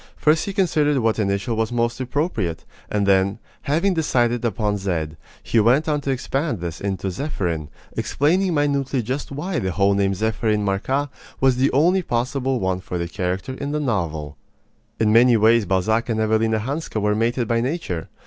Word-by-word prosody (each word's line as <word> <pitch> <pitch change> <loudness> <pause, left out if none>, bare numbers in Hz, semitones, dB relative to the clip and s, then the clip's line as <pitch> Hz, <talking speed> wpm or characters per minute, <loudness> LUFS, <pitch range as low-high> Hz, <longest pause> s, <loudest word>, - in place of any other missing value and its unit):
First 155 +1 +3
he 200 - -3
considered 155 -7 +2
what 115 -3 +1
initial 100 +2 0
was 110 +1 -1
most 120 0 0
appropriate; 125 - -2 0.2
and 105 -1 0
then, 100 0 +3 0.2
having 165 +7 +1
decided 120 -7 +1
upon 105 -2 -1
Z, 85 -5 -2 0.3
he 115 - +2
went 125 +9 +3
on 150 -1 0
to 140 - -4
expand 135 - -1
this 85 -1 -5
into 95 -1 -2
Zepherin, 85 - -3 0.3
explaining 175 +5 +1
minutely 140 -3 0
just 130 +6 -4
why 160 +5 -2
the 95 - -2
whole 100 +2 +2
name 100 -1 +1
Zepherin 110 0 0
Marcas, 130 +9 0 0.3
was 130 -2 +3
the 135 +2 +2
only 175 +7 +3
possible 130 -1 -1
one 95 -1 -1
for 90 -1 -5
the 85 0 -2
character 95 +5 -3
in 140 +2 -4
the 150 - 0
novel. 80 - -2 0.6
In 110 -1 +3
many 120 +1 +6
ways 110 -1 +4
Balzac 110 +6 +1
and 110 -1 0
Evelina 110 0 +2
Hanska 140 0 -3
were 105 0 +1
mated 115 +2 0
by 115 0 +1
nature. 125 - -3
115 Hz, 175 wpm, -22 LUFS, 100-140 Hz, 0.6 s, many